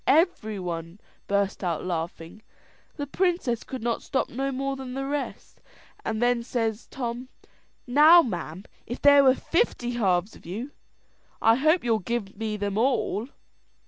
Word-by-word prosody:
Everybody 195 - 0 0.3
burst 200 0 0
out 170 -3 -1
a - - -9
laughing 170 +2 -5 0.5
the 290 - -3
princess 315 -7 0
could 260 -3 -7
not 235 -1 -1
stop 265 - -1
no 270 +3 -2
more 275 +1 -2
than 260 -1 -7
the 270 0 -2
rest; 285 +1 -5 0.4
and 220 -1 -2
then 245 0 +2
says 230 -2 -2
Tom, 245 0 -5 0.6
"Now, 305 +7 +7
ma'am, 180 -3 -5 0.2
if 240 - -5
there 285 -1 +7
were 260 -1 +6
fifty 330 - 0
halves 195 -4 0
of - - -16
you, 220 - -6 0.7
I 225 - +5
hope 310 +8 +3
you'll 230 -2 +2
give 215 0 -3
me 220 -1 -3
them 205 0 -2
all." 240 -2 +1
235 Hz, 150 wpm, -26 LUFS, 200-270 Hz, 0.7 s, Now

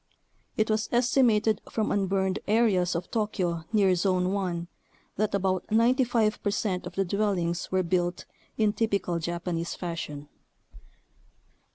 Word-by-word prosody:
It 215 0 +2
was 215 0 0
estimated 235 -4 +3
from 220 -2 -1
unburned 190 -1 0
areas 200 -5 +2
of 170 +1 -4
Tokyo 180 -7 -1
near 200 -4 +4
Zone 185 0 +1
1 175 -4 -2 0.5
that 210 0 0
about 185 -2 -1
95 230 -1 +2
per 205 - 0
cent 195 -2 -2
of - - -10
the 195 - +1
dwellings 185 -3 -1
were 185 0 +2
built 175 0 -1 0.3
in 215 -2 +2
"typical 200 -6 0
Jap 170 +1 -3
anese 170 -1 -3
fashion." 160 -4 -5
195 Hz, 135 wpm, -27 LUFS, 175-215 Hz, 0.5 s, near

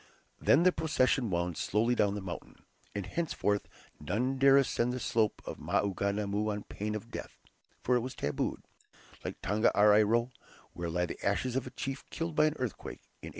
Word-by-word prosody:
Then 160 - +5
the 185 - +6
procession 135 -7 +1
wound 85 -2 -1
slowly 115 +4 +2
down 105 -4 +2
the 105 - -4
mountain, 90 -2 -8 0.3
and 100 -2 -2
henceforth 105 - -1 0.3
none 125 - -1
dare 135 0 +7
ascend 125 -3 +2
the 130 - -3
slope 110 -3 0
of - - -6
Maunganamu 100 +1 0
on 105 0 -4
pain 105 +1 -4
of 115 +3 -7
death, - - -7 0.5
for 125 - +3
it - - 0
was 130 +2 -5
"tabooed," 75 - -2 0.6
like - - -5
Tongariro, 105 +3 +4 0.4
where 85 -1 -4
lie 90 +2 0
the 85 - -8
ashes 120 +5 0
of 130 -1 -1
a - - -5
chief 135 +2 -5
killed 165 0 -3
by 150 - +5
an 155 - 0
earthquake 125 -4 -5 0.2
in - - -7
1846. - - -6
110 Hz, 180 wpm, -31 LUFS, 100-130 Hz, 0.6 s, dare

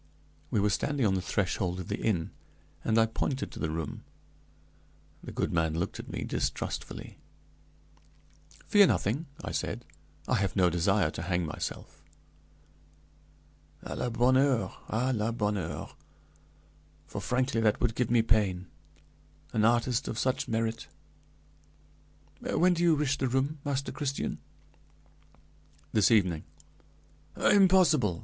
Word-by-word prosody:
We - - +1
were 105 +1 +2
standing 135 +7 0
on 100 - +3
the 95 - 0
threshold 90 -1 -1
of 90 - -6
the 105 - -3
inn, 90 -7 0 0.5
and 110 - +1
I 115 - +6
pointed 130 +4 -2
to - - -9
the 80 - -1
room. 80 -2 -4 1.2
The - - -7
good - - -2
man 80 -2 +1
looked 85 +4 -3
at - - -8
me - - -3
distrustfully. - - -4 1.5
"Fear 205 -2 +6
nothing," 140 - 0 0.2
I - - -4
said; 120 +4 -3 0.4
"I 125 - +2
have 100 -1 -1
no 90 -3 +4
desire 90 0 +2
to - - -6
hang 90 0 0
myself.". 75 - -6 1.8
"À - - -5
la 125 - -1
bonne 120 +3 +3
heure! 135 -3 +2 0.2
à 125 +4 0
la 110 +1 0
bonne 105 -2 0
heure! 80 -5 -5 1.1
For - - -6
frankly 125 -1 0
that 110 -2 +2
would 120 -2 +1
give 120 0 -1
me 120 -1 +4
pain; 100 -5 +1 0.9
an 110 - +2
artist 120 +1 +2
of 110 - -4
such 130 +1 0
merit! 115 0 -2 1.5
When 180 +1 +2
do 170 - -2
you 170 -2 +5
wish 145 -2 0
the 130 - +1
room, 135 +4 0
Master 140 -2 -2
Christian?" 140 -2 -3 1.5
"This 105 -3 +4
evening." 90 -8 +2 0.9
"Impossible! 180 - +4
115 Hz, 135 wpm, -29 LUFS, 95-130 Hz, 1.8 s, I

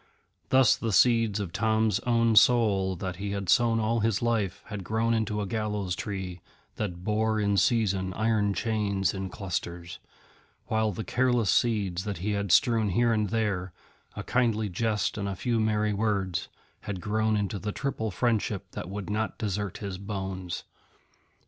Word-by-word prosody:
Thus 130 -2 +5
the 115 - -3
seeds 115 0 +4
of 95 -5 -4
Tom's 110 -2 +2
own 115 -1 +3
soul 105 -6 +4
that 90 0 -5
he 100 +1 -3
had 100 -3 -4
sown 115 -1 +4
all 115 +1 +1
his 110 -1 +1
life 115 -5 -1
had 105 -3 -6
grown 110 +4 0
into 110 -2 0
a - - -2
Gallows 105 -3 -2
Tree 95 -4 -5 0.4
that 90 -4 -4
bore 110 +1 +1
in 100 -1 +1
season 95 -2 +2
iron 110 -2 +1
chains 105 -4 0
in 95 -1 -4
clusters; 90 -5 -5 0.7
while 110 -1 +1
the 105 +3 -5
careless 120 -4 +2
seeds 100 -7 +1
that 105 -3 -3
he 100 +5 -2
had 100 -2 -1
strewn 115 -1 +4
here 115 +4 +2
and 105 -2 0
there, 100 -5 -1 0.4
a - - -5
kindly 115 -4 +1
jest 105 +2 -1
and 100 -1 -2
a 95 - -3
few 120 0 0
merry 105 -1 +1
words, 100 -4 -1 0.3
had 100 -3 -5
grown 110 +2 0
into 100 0 -2
the 105 +2 -3
triple 110 -3 -3
friendship 105 -1 -1
that - - -6
would 100 0 -5
not 110 +1 -2
desert 100 -2 -3
his 100 -3 -5
bones. 95 -3 -5
105 Hz, 165 wpm, -28 LUFS, 95-110 Hz, 0.7 s, Thus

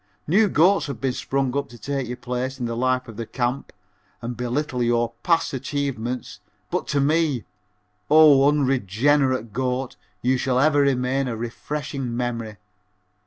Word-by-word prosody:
New 205 +6 +3
goats 180 +2 +3
have 140 -4 -5 0.2
sprung 135 0 -1
up 140 -1 -1
to 120 - -12
take 135 +3 -3
your 125 +1 -5
place 125 +2 -4
in 120 - -2
the 115 0 -3
life 130 +1 0
of 115 -3 -10
the 115 - -4
camp 125 +2 -2 0.5
and 120 +1 -5
belittle 125 +2 -2
your 120 -1 +1
past 165 -3 +1
achievements, 130 -3 -3 0.3
but - - -1
to 145 - 0
me, 150 -3 +1 0.7
O 145 -2 +7
unregenerate 130 -2 +1
goat, 130 +1 -2 0.3
you 130 +2 +2
shall 125 0 0
ever 145 +2 +4
remain 135 0 +1
a 115 -2 -3
refreshing 130 +1 -4
memory. 115 -4 -3
130 Hz, 150 wpm, -23 LUFS, 120-140 Hz, 0.7 s, O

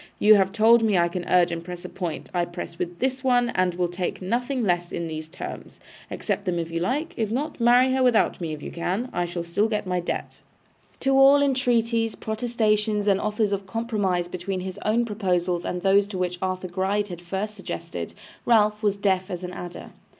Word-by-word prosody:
You 215 +1 +7
have 195 -2 +4
told 225 +2 +5
me 215 -4 +2
I 170 0 +4
can 175 0 -5
urge 180 -1 +4
and 165 0 -4
press 175 0 -8
a - - -3
point. 175 -4 -5
I 175 -1 +1
press 175 -1 -6 0.2
this 260 +3 -1
one, 245 -2 +3
and 185 -5 0
will 175 0 +1
take 175 +1 -3
nothing 245 +6 -1
less 175 -3 0
than 170 - -4
these 155 -1 -5
terms. 170 - -8 0.3
Accept 200 - -3
them 180 -2 0
if 165 -1 -3
you 165 - -1
like. 295 - -1
If 220 -3 0
not, 280 +7 -3
marry 245 +2 +5
her 265 - +1
without 245 -7 +3
me 165 -2 -3
if 150 -1 -6
you - - -6
can. 190 +9 -2
I 175 0 0
shall 175 0 -4
still 170 +6 +1
get 215 -2 -2
my 180 -1 0
debt.' 175 - -4 0.6
To 270 - +2
all 270 +1 +7
entreaties, 235 -4 +1
protestations, 215 -2 0
and 195 -2 +3
offers 210 -1 0
of 195 -1 -3
compromise 200 -5 -1
between 180 +1 -4
his 185 0 -6
own 230 +3 +2
proposals 180 -5 -1
and 180 0 -3
those 200 +1 +3
which 180 -1 -2
Arthur 185 0 -2
Gride 195 +3 -1
had 175 -1 -7
first 195 +4 -4
suggested, 195 -2 -6 0.3
Ralph 210 -2 +3
was 205 -2 +1
deaf 190 -1 +1
as 180 -1 -5
an 180 0 -5
adder. 175 -1 -8
195 Hz, 205 wpm, -25 LUFS, 180-225 Hz, 0.6 s, You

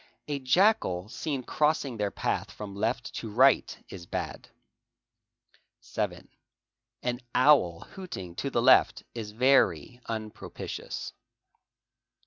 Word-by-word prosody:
A 145 -2 -2
jackal 130 - +2
seen 135 +2 -3
crossing 150 -3 0
their 105 -1 0
path - - -2
from 100 -2 -8
left 115 +4 -2
to 115 - -5
right 130 +5 +4
is 90 -3 -9
bad. - - -5 1.3
7. - - -4 0.8
An 125 0 -1 0.2
owl 125 - +4
hooting 95 - -8
to 140 - -2
the 120 -3 0
left 130 - +5
is 110 -3 -5
very 120 - +2
unpropitious. 110 -2 -6
120 Hz, 110 wpm, -28 LUFS, 105-140 Hz, 1.3 s, left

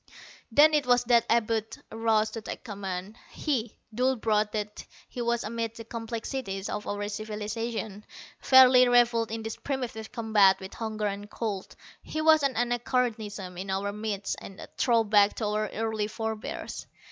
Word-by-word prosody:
Then 300 +6 +6
it 295 -4 +2
was 245 0 +4
that 235 -1 +3
Abud 225 -1 +1
arose 220 -1 +1
to 225 - -6
take - - -7
command. 200 -1 -6
He, 245 -7 -2 0.2
dull 255 +3 +2
brute 215 -2 +1
that 210 -1 -4 0.2
he 245 - -6
was 235 0 0
amid 230 +1 -3
the 230 - -8
complexities 225 -3 -5
of 210 0 -4
our 205 0 -2
civilization, 215 0 -4 0.4
fairly 255 -1 +7
reveled 240 -2 +3
in 225 0 -4
this 220 0 -5
primitive 250 -5 -4
combat 215 -4 +4
with 190 0 -9
hunger 220 -2 -3
and 205 0 -4
cold. 210 -5 -4 0.3
He 310 - -5
was 315 0 +5
an 275 -2 0
anachronism 230 -6 -1
in 195 +1 -6
our 195 +1 -1
midst, 210 -2 -3
a 195 - -10
throwback 215 -4 +3
to 220 - -3
our 210 +1 0
early 220 -1 -2
forebears. 220 0 -5
220 Hz, 155 wpm, -28 LUFS, 210-240 Hz, 0.4 s, fairly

